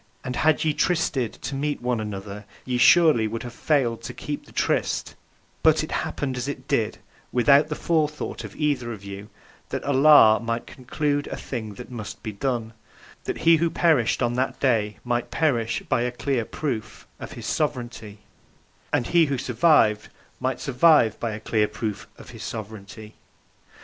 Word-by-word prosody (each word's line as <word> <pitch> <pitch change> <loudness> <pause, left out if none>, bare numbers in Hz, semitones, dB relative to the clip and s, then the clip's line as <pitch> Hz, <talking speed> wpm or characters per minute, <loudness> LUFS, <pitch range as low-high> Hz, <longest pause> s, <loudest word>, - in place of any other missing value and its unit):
And 125 -2 -4
had 155 +3 +3
ye 155 - +2
trysted 145 -9 0
to - - -4
meet 145 +2 -2
one 125 -1 -1
another 105 0 -6 0.2
ye 125 -1 -1
surely 150 -6 +6
would 115 +1 -5
have 120 -1 -8
failed 120 -4 0
to - - -7
keep - - -6
the - - -16
tryst, - - -1 0.5
but - - +4
(it - - -6
happened, 135 -3 -3
as 125 +2 -3
it 140 -1 -6
did, 115 -7 0 0.3
without 140 +4 +5
the 150 - -3
forethought 155 -2 -1
of - - -9
either 140 -6 -1
of 100 -3 -9
you) 100 +1 -8 0.4
that - - -4
Allah 140 -5 +6
might 115 0 -3
conclude 145 +2 -2
a - - -5
thing 110 -5 -6
that 125 +4 -10
must 110 -4 -7
be 110 - -4
done; 115 0 -3 0.5
that - - -4
he 165 0 +7
who 170 +1 +1
perished 155 -10 +2
(on 120 - +1
that 130 +2 -1
day) 110 -6 +1
might 120 -1 -1
perish 120 -8 0
by - - +1
a 125 +1 -1
clear 125 -1 -1
proof 125 -7 -5
(of - - -8
His - - -8
Sovereignty) 110 -4 -3 0.7
and 120 - +1
he 170 +3 +3
who 140 -1 -1
survived 120 -4 +3 0.3
might - - -2
survive 135 -3 +4
by 115 - -2
a 105 0 -5
clear 110 -1 +1
proof 105 -1 -5
(of - - -12
His - - -11
Sovereignty). 110 -1 -8
120 Hz, 175 wpm, -24 LUFS, 110-145 Hz, 0.7 s, he